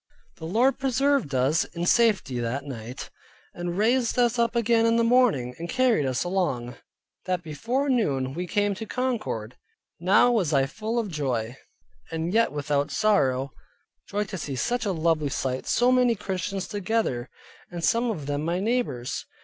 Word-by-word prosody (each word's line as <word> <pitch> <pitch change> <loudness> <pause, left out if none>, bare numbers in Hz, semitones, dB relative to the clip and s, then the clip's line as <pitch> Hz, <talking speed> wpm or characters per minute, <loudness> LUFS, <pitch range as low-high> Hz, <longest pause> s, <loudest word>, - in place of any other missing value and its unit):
The 160 - -8
Lord 240 +9 +2
preserved 270 - +1
us 135 +5 +2
in 170 0 -5
safety 195 - +2
that 120 +4 -2
night, 125 -2 -7 0.4
and 175 0 -4
raised 235 +4 +2
us 240 -1 +2
up 235 0 +1
again 230 0 +3
in 230 - +3
the 230 - +3
morning, 230 - +3
and 170 +1 -5
carried 250 - +2
us 130 0 0
along, 150 -10 -1 0.5
that 180 -2 -1
before 230 - -2
noon, 140 - 0
we 175 +4 -4
came 205 +1 +1
to 215 +3 -7
Concord. 215 - -3 0.4
Now 195 +7 +4
was 190 -10 +1
I 135 -1 +4
full 220 - -4
of 220 -5 -1
joy, 125 -6 -2 0.5
and 165 +2 -3
yet 230 +1 +4
not - - -14
without 145 -1 -1
sorrow; 135 -11 +1 0.6
joy 205 +1 0
to 195 -2 -6
see 140 -3 -4
such 240 - -1
a - - +1
lovely 160 -3 +1
sight, 130 -1 -3
so 245 +1 +3
many 250 -2 +4
Christians 195 -1 -3
together, 205 - -1 0.4
and 175 -2 -6
some 235 +5 +2
of 160 -11 -4
them 145 +1 -2
my 170 +3 -1
neighbors. 205 - -2
185 Hz, 170 wpm, -26 LUFS, 140-230 Hz, 0.6 s, Now